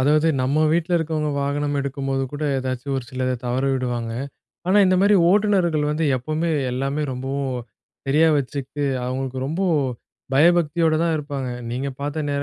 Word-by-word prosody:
அதாவது, 150 +4 +3
நம்ம 150 +4 +2
வீட்ல 170 +1 0
இருக்கிறவங்க 155 -2 -1
வாகனம் 145 +1 -1
எடுக்கும்போது 135 -1 -2
கூட 145 +1 -5 0.2
எதாச்சும் 130 +1 -3
ஒரு 130 - -3
சிலத 130 0 -1
தவற 125 +2 0
விடுவாங்க. 120 -3 -2 0.5
ஆனா, 195 +3 +4
இந்த 185 0 +3
மாரி 205 +1 +5 0.2
ஓட்டுநர்கள் 185 -7 +2
வந்து 155 +2 0
எப்போவுமே 155 +6 -2 0.2
எல்லாமே 135 +4 -1
ரொம்பவும் 135 0 -3 0.5
சரியா 155 +4 +4
வச்சுக்கிட்டு, 140 +1 -4 0.2
அவங்களுக்கு 130 0 -3
ரொம்பொ 170 +7 -1 0.7
பயபக்தியோட 165 +1 +4
தான் 170 -1 +1
இருப்பாங்க. 140 -3 -4 0.2
நீங்க 130 +3 -2
பாத்த 145 +2 -3
நேர 140 0 -1
145 Hz, 145 wpm, -22 LUFS, 130-160 Hz, 0.7 s, மாரி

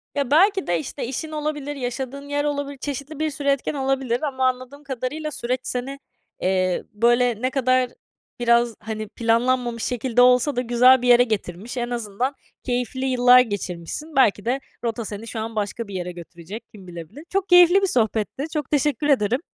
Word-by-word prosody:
Ya 280 -2 -1
belki 385 +4 +4
de 175 -1 +1
işte 155 - -5
işin 310 +5 -5
olabilir, 295 -1 -3
yaşadığın 265 +2 -5
yer 290 0 0
olabilir, 285 -1 -3
çeşitli 280 +2 -6
bir 310 0 0
sürü 285 -1 -6
etken 275 +1 0
olabilir 270 -3 -1
ama 260 -4 0
anladığım 255 +3 -4
kadarıyla 280 +3 -4
süreç 250 -1 -2
seni, 265 +3 -4 0.4
eee, 185 -1 +1
böyle 240 +1 +2
ne 255 - +1
kadar 255 -1 +2 0.5
biraz 235 -1 +3
hani 215 -1 -5
planlanmamış 235 0 0
şekilde 245 0 +1
olsa 250 +3 +4
da 250 - +1
güzel 250 +1 +5
bir 250 - -1
yere 245 0 +7
getirmiş. 215 0 -4
En 240 0 -2
azından 240 +3 -2 0.3
keyifli 250 +1 -2
yıllar 250 -1 +6
geçirmişsin. 205 - -3
Belki 220 -5 +3
de 255 +3 0 0.2
rota 230 -1 -2
seni 210 +2 -7
şu 225 - -5
an 225 +1 -5
başka 210 +1 -3
bir 195 - -8
yere 180 0 -3
götürecek, 175 +5 -10
kim 195 -4 -14
bilebilir. 170 - -10
Çok 390 0 -1
keyifli 355 +2 +7
bir 390 - +2
sohbetti, 225 - 0
çok 300 -4 -3
teşekkür 290 -1 +1
ederim. 250 -4 +2
250 Hz, 175 wpm, -23 LUFS, 225-280 Hz, 0.5 s, yere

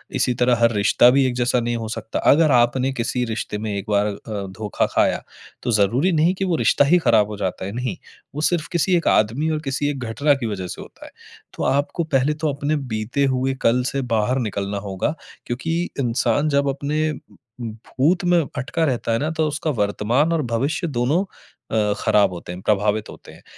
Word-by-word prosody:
इसी 130 -1 +2
तरह 125 0 +4
हर 115 - +5
रिश्ता 105 +4 +5
भी 135 +1 +4
एक 125 - -1
जैसा 125 0 +1
नहीं 120 0 -1
हो 115 -1 -4
सकता। 110 0 -4
अगर 155 0 +4
आपने 125 +2 +3
किसी 125 0 -1
रिश्ते 110 -2 -4
में 110 0 -3
एक 100 - -4
बार 100 0 +2
अ, 105 - -2 0.4
धोखा 105 0 -1
खाया - - +1 0.4
तो 120 - 0
ज़रूरी 115 - +2
नहीं 165 +3 +3
कि 195 - -2
वो 180 -3 +1
रिश्ता 145 - +3
ही 175 +5 +5
ख़राब 110 -9 +3
हो 105 -1 -7
जाता 95 -2 -3
है, 100 - -4
नहीं। 125 -4 -3 0.4
वो 150 - -3
सिर्फ 165 0 +1
किसी 180 +2 +2
एक 170 - -2
आदमी 120 +9 +2
और 155 - -1
किसी 140 +2 -1
एक 140 -2 -4
घटना 140 +6 +2
की 135 - -4
वजह 95 -4 -4
से - - -7
होता - - -13
है। - - -12 0.4
तो - - -4
आपको 145 +5 0
पहले 135 +3 +3
तो 155 -2 -1
अपने 145 +2 -1 0.2
बीते 110 +6 0
हुए 130 +1 0
कल 125 +2 +3
से 140 - 0
बाहर 110 +5 +1
निकलना 100 0 -3
होगा 95 - -2 0.3
क्योंकि 160 +8 -2 0.2
इंसान 120 +4 +1
जब 140 0 +2
अपने 150 +3 -1 0.5
भूत 130 - -1
में 175 -1 +4 0.2
अटका 140 +6 -1
रहता 125 -4 -1
है 115 - +1
ना 150 - -1
तो 160 -1 0
उसका 155 +2 -3
वर्तमान 115 +6 +1
और 165 - +1
भविष्य 145 +9 0
दोनों 145 +8 0 0.5
अ, 105 -2 +2
ख़राब 100 -3 +3
होते 85 0 -8
हैं, 90 - -9
प्रभावित 105 +1 0
होते - - -12
हैं। - - -17
125 Hz, 205 wpm, -21 LUFS, 110-150 Hz, 0.5 s, हर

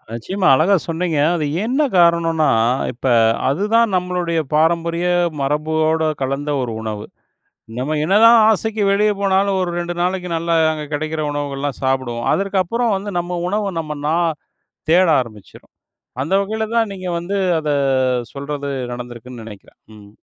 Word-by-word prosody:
நிச்சயமா 185 - -2
அழகா 175 +8 +3
சொன்னீங்க. 165 -1 -1 0.2
அது 155 -3 -1 0.2
என்ன 260 +6 0 0.2
காரணம்னா, 170 -2 +3 0.5
இப்ப, 120 - -10 0.4
அதுதான் 210 +8 +2
நம்பளோடைய 180 -2 -1
பாரம்பரிய 170 +2 +1 0.4
மரபோட 155 +2 0
கலந்த 135 +2 -2
ஒரு 125 -2 -3
உணவு. 105 -1 -5 0.7
நம்ப 130 +5 -2
என்னதான் 225 +7 +6
ஆசைக்கு 220 0 -1
வெளிய 210 +1 +3
போனாலும், 195 0 +2
ஒரு 180 -1 -1
2 175 0 -3
நாளைக்கு 180 0 -1
நல்லா 165 +1 -1 0.2
அங்க 155 -1 -5
கிடைக்கிற 155 +1 -3
உணவுகள்லாம் 145 -1 -4
சாப்பிடுவோம். 130 -3 -1
அதற்கப்புறம் 200 +4 0
வந்து 200 +1 -5
நம்ப 175 +1 -3
உணவு 205 +1 -1
நம்ப 155 -1 -5
நா 160 - +1 0.7
தேட 180 +3 +5
ஆரம்பிச்சுரும். 110 -5 -9 0.5
அந்த 155 +7 -2
வகைல 220 +2 -3
தான் 225 -2 +2
நீங்க 185 -1 -7
வந்து 180 +4 -4 0.2
அத 155 -1 -3 0.7
சொல்றது 140 0 -5 0.2
நடந்துருக்குன்னு 120 -1 -8
நினைக்குறேன். 105 -3 -13 0.2
ம். 100 -1 -15
165 Hz, 135 wpm, -19 LUFS, 140-190 Hz, 0.7 s, என்னதான்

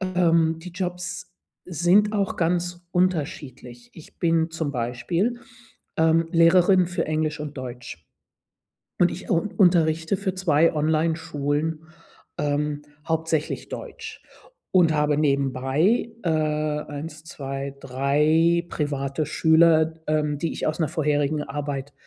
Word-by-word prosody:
ähm, 170 -3 +2
die 180 +2 -9
Jobs 180 0 -5 0.3
sind 180 +5 +3
auch 200 -2 -1
ganz 175 +1 -1
unterschiedlich. 145 -9 -2
Ich 160 - -15
bin 165 -1 +1
zum 160 -3 -3
Beispiel, 165 - -1 0.6
ähm, 160 +1 +3
Lehrerin 180 +2 +5
für 175 - -2
Englisch 155 0 -1
und 150 -1 -7
Deutsch. 120 - -8 1.0
Und 175 - +4
ich 185 - -8
u 180 - +3 0.2
unterrichte 165 -2 +3
für 190 -1 -3
2 165 -3 +3
Onlineschulen, 155 0 -1 0.5
ähm, 145 0 -1 0.2
hauptsächlich 160 -1 -1
Deutsch 450 -2 -8 0.5
und 170 -4 +4
habe 150 -1 +1
nebenbei, 140 - +1
äh, 175 - -1
1, 150 0 -2
2, 140 -2 -6
3 150 +6 +2
private 140 0 -2
Schüler, 160 +1 +4
ähm, 150 -1 0
die 165 +3 -2
ich - - -3
aus 155 +2 -2
'ner 160 - +1
vorherigen 150 -1 0
Arbeit 145 -1 -5
160 Hz, 115 wpm, -24 LUFS, 145-175 Hz, 1.0 s, Lehrerin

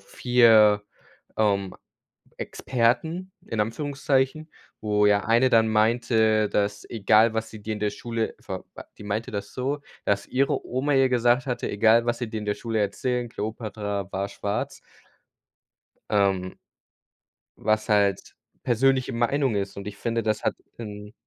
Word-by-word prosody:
4, 110 -4 +4 0.5
ähm, 100 -3 +1 0.6
Experten 160 +10 -1
in 110 - -2
Anführungszeichen, 140 +5 -1 0.3
wo 105 -1 +1
ja 100 0 +3
eine 120 +3 +4
dann 110 -2 +4
meinte, 110 -1 +2
dass: 100 -1 -1
„Egal, 110 +1 +3
was 110 0 -2
sie 110 -1 -10
dir 110 0 -3
in 105 - -7
der 105 -1 +1
Schule 115 +1 -3
ver 95 -1 -7
b“ - - -8 0.2
Die - - -10
meinte 105 +3 -3
das 100 -1 -5
so, 140 +3 -2 0.3
dass 100 0 +1
ihre 135 +2 0
Oma 135 +3 0
ihr 135 -1 +4
gesagt 125 +1 +3
hatte: 125 - -2
„Egal, 110 +3 +4
was 120 0 +1
sie 120 -3 -4
dir 110 - -3
in 105 - -6
der 105 - 0
Schule 115 -2 -3
erzählen, 120 +4 -1
Kleopatra 105 -3 -4
war 100 +1 -2
schwarz.“ 100 +1 -4 1.3
Ähm. 95 -3 +1 1.0
Was 110 +1 0
halt 100 -3 +1 0.3
persönliche 130 +2 +2
Meinung 120 +1 +1
ist. 100 0 -3
Und 100 0 -7
ich 100 -1 -6
finde, 115 +1 -2
das 110 -1 -1
hat - - +1 0.2
'nen 105 -2 -8
110 Hz, 150 wpm, -25 LUFS, 105-125 Hz, 1.3 s, 4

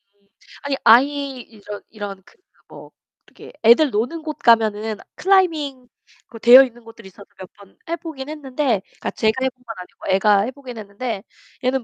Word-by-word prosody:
음 200 0 -38 0.4
아니 280 -1 -1
아이 270 +2 +3
이런 210 -2 -11
이런 200 -3 -8
그 - - -22 0.3
뭐 - - -13 0.4
이렇게 - - -14
애들 260 +6 +6
노는 245 +10 -2
곳 310 -1 -5
가면은 220 -2 +2 0.2
클라이밍 310 -10 +1 0.4
그 230 - -12
되어있는 240 0 +6
곳들이 225 -2 -13
있어서 200 +2 -15
몇 185 - -11
번 200 -1 -19
해보긴 320 -5 -6
했는데, 275 -6 -1
그러니까 - - -8
제가 220 0 +1
해본 260 -1 -2
건 225 -2 -7
아니고 180 +1 -3
애가 205 +1 +4
해보긴 255 0 -8
했는데 210 +1 -5 0.4
얘는 260 0 0
240 Hz, 340 characters per minute, -20 LUFS, 210-275 Hz, 0.4 s, 애들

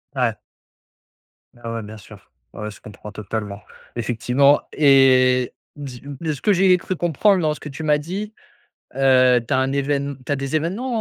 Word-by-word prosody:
Ouais. - - 0 1.2
Bah, 115 -1 -7
ouais, 115 - -3
bien 105 +1 -10
sûr. 100 -2 -16 0.2
Ouais, - - -9
ouais, 105 - -5
je - - -15
comprends 105 0 -11
totalement. 105 -1 -6 0.4
Effectivement 125 +5 +2
et 130 -3 +4 0.2
dis-m 140 -1 -9
de 160 -2 -2
ce 140 - -10
que 210 - +3
j'ai 185 0 +4
cru 185 +1 -4
comprendre 175 +4 +2
dans 155 -2 +1
ce - - -11
que - - -9
tu 140 +3 -8
m'as 150 -1 +3
dit, 190 +8 -6 0.6
heu, 130 -2 +4
tu 130 - -2
as - - +2
un 130 0 +1
évén 140 0 -1
tu - - -4
as - - +2
des 135 +2 -3
événements 220 - -3
135 Hz, 185 wpm, -21 LUFS, 120-155 Hz, 1.2 s, et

